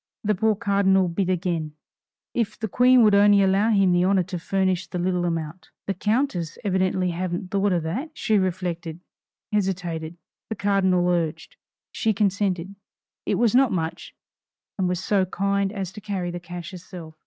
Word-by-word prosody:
The 210 0 +2
poor 215 +2 +1
cardinal 195 -3 +2
bit 185 +2 -1
again 170 -4 -1 0.6
"If 225 -3 -1
the 220 - -3
Queen 250 +4 +5
would 210 -2 +5
only 200 0 +6
allow 195 +3 +3
him 195 -4 +3
the 175 0 +3
honor 190 0 +3
to 180 0 -5
furnish 185 0 0
the - - -5
little 180 0 0
amount!" 165 0 -4 0.2
The 195 - -1
countess 210 - -1
evidently 185 -2 +1
hadn't 180 +1 -4
thought 200 0 +1
of 175 -3 0
that. 225 - -3
She 215 -2 +2
reflected 175 -3 -3 0.5
hesitated. 175 -5 -2 0.3
The 220 - -3
cardinal 190 -3 +2
urged. 175 - -1 0.4
She 220 -2 0
consented 195 -2 0 0.5
it - - +1
was 235 -3 +2
not 260 -1 +4
much 165 -3 -4 0.6
and 185 -1 +1
was 180 -1 -1
so 195 -2 +2
kind 200 +1 0
as 195 -4 -4
to 210 - -10
carry 190 -4 -3
the 175 - -5
cash 175 -1 -8
herself. 175 -3 -10
190 Hz, 165 wpm, -24 LUFS, 175-200 Hz, 0.6 s, only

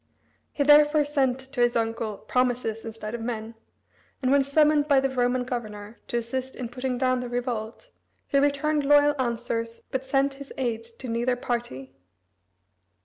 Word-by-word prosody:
He 285 - 0
therefore 295 +1 +6
sent 270 -4 +1
to 265 -1 -5
his 240 0 +3
uncle 225 -2 -1
promises 245 -2 -1
instead 220 -1 -6
of 235 - -4
men, 225 -1 -4 0.7
and 260 -2 +1
when 280 0 +5
summoned 295 +1 +3
by 280 -3 +5
the 270 0 0
Roman 250 0 +1
governor 215 -3 -6
to 240 - -1
assist 255 +3 -4
in 245 -2 -5
putting 250 0 -3
down 255 0 +1
the 250 -1 -5
revolt, 245 - -4 0.3
he 280 - +2
returned 290 +1 +1
loyal 290 +1 +5
answers, 230 -1 -3
but 265 0 -2
sent 275 +1 +1
his 280 - -9
aid 235 -4 -1 0.2
to 260 - -7
neither 240 +2 0
party. 235 - -4
250 Hz, 160 wpm, -26 LUFS, 230-275 Hz, 0.7 s, therefore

